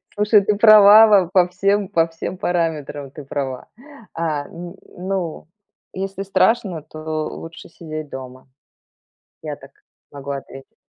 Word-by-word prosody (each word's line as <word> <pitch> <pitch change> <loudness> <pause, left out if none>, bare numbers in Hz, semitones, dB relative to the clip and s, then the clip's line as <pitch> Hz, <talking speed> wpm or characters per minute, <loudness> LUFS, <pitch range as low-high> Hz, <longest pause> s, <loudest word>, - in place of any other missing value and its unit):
Слушай, 210 0 +4
ты 210 +1 +1
права 215 0 +8
во 200 -4 +4
по 180 -1 +3
всем 195 +2 0
по 165 -2 +2
всем 165 +3 -7
параметрам 160 -6 -3
ты 150 +1 -10
права. 135 -2 -5 0.5
А, 155 -3 -2
ну, 175 0 -6 0.5
если 195 +1 -5
страшно, 195 -3 +1
то 155 - -12 0.3
лучше 165 0 -10
сидеть 155 -2 -8
дома. 130 0 -10 0.9
Я - - -5
так - - -16 0.4
могу 140 0 -7
ответить. 135 -1 -9
170 Hz, 125 wpm, -20 LUFS, 145-195 Hz, 0.9 s, права